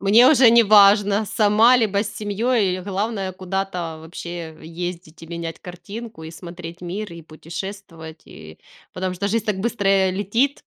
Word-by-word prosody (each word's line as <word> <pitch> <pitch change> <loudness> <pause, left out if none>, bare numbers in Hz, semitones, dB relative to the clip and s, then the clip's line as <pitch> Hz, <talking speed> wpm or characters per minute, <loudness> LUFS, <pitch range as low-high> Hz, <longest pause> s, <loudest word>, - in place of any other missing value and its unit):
Мне 220 +6 +6
уже 255 -5 +6
неважно, 205 -2 +5
сама 220 +5 +4
либо 205 -4 +1
с 205 - -7
семьей, 210 -2 0
э, - - -8
главное 195 0 -3
куда-то 185 -3 -4
вообще 165 0 -8
ездить 170 -1 -7
и 165 - -9
менять 170 -1 -6
картинку, 195 +3 -9
и 160 - -8
смотреть 170 0 -10
мир, 185 +2 -5
и 170 - -10
путешествовать, 165 0 -9
и 80 0 -13 0.3
Потому 185 0 -3
что 200 +3 -2
жизнь 225 +1 0
так 210 -3 -1
быстро, 210 -2 -1
э, 190 -1 +3
летит 230 +9 0
195 Hz, 155 wpm, -21 LUFS, 170-210 Hz, 0.3 s, Мне